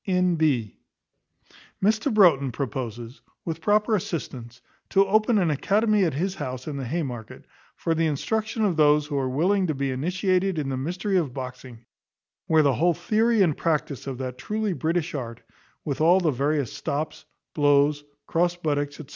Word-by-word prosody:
N.B. 160 - +1 1.1
Mr 220 +6 +2
Broughton 165 - +4
proposes, 120 -1 -5 0.2
with 165 -1 -4
proper 210 +4 +2
assistance, 125 - -5 0.3
to 195 0 +4
open 215 +3 +3
an 175 -5 +2
academy 210 +7 +2
at 160 - -1
his 185 +6 -1
house 130 -8 -6
in 150 - -5
the 135 - -4
Haymarket, 125 -7 -5 0.3
for 165 - -1
the 165 0 +1
instruction 215 - -1
of 185 -5 +1
those 150 -1 +4
who 145 -1 -5
are 130 -1 -1
willing 185 +8 +1
to 155 - -1
be 135 0 -1
initiated 185 +6 0
in 145 -3 -2
the 135 - -2
mystery 180 +9 -1
of 150 -8 -1
boxing: 125 -3 -8 0.6
where 160 -1 +4
the 140 -2 +3
whole 170 +7 +2
theory 220 +5 +2
and 160 -6 +1
practice 150 -4 -2
of 135 -2 -4
that 130 -1 -6
truly 215 -2 -2
British 165 0 -1
art, 120 -5 -5 0.5
with 145 0 -3
all 175 +4 +5
the 170 -4 +1
various 140 0 -1
stops, 150 +2 -4 0.3
blows, 145 0 +3 0.2
cross 175 +1 +1
buttocks, 145 -4 -2
&c. 155 - -9
155 Hz, 165 wpm, -25 LUFS, 135-185 Hz, 1.1 s, all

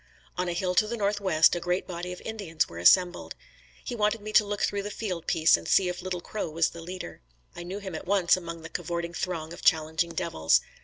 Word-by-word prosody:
On 180 0 -1
a 175 - -1
hill 180 +1 -1
to 215 - +3
the 235 +2 -3
northwest, 200 -6 +3
a - - -1
great 180 +2 -1
body 180 0 -5
of 180 - -8
Indians 200 -8 -2
were 85 - -9
assembled. 175 - +4 0.5
He - - -4
wanted 215 0 +1
me 215 +1 -7
to 215 - +7
look 205 0 -4
through 200 0 0
the 205 - -5
field 185 -6 -5
piece 165 -2 +5
and 85 0 -6
see 185 -2 +4
if 180 0 -5
Little 180 -1 -4
Crow 210 -1 -4
was 165 +1 +1
the 170 - -9
leader. 175 - -8 0.3
I - - -7
knew 180 +3 -5
him 195 -3 -7
at 160 - -7
once 190 -3 +4
among 170 -2 -7
the 160 - -8
cavorting 170 0 -4
throng 170 -2 -4
of - - -10
challenging 160 +1 +2
devils. 160 - +2
180 Hz, 235 wpm, -27 LUFS, 165-200 Hz, 0.5 s, to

